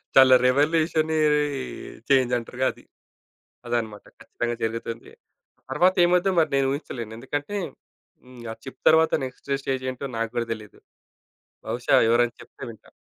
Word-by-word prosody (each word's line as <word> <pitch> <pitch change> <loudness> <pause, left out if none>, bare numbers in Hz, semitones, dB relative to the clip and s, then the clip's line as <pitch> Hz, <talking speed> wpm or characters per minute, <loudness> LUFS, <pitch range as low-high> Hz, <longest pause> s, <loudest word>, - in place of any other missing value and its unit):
చాలా 130 -1 +8
రివల్యూషనే 155 +4 +2 0.9
చేంజ్ 130 -3 +3
అంటారుగా 120 +2 -3
అది. - - -19 0.8
అదనమాట 115 -3 -3 0.2
ఖచ్చితంగా 120 0 -4
జరుగుతుంది. 115 +1 -4 0.6
తర్వాత 185 +1 +3
ఏమవుద్దో 180 +2 +3 0.2
నేను 135 -1 +2
ఊహించలేను. 120 -6 -6
ఎందుకంటే 145 - -4 0.7
హ్మ్. 125 -1 -14
ఆ - - -7
చిప్ 135 - -10
తరువాత 160 0 +5
నెక్స్టు 135 +2 -4
స్టేజేంటో 130 0 -3
నాకు 115 0 -2
కూడా 120 -1 0
తెలియదు. 105 -2 -9 0.9
బహుశా, - - +1
ఎవరైనా 120 +1 +2
చెప్తే - - -13
వింటాను. 110 - -14
130 Hz, 120 wpm, -24 LUFS, 120-145 Hz, 0.9 s, చాలా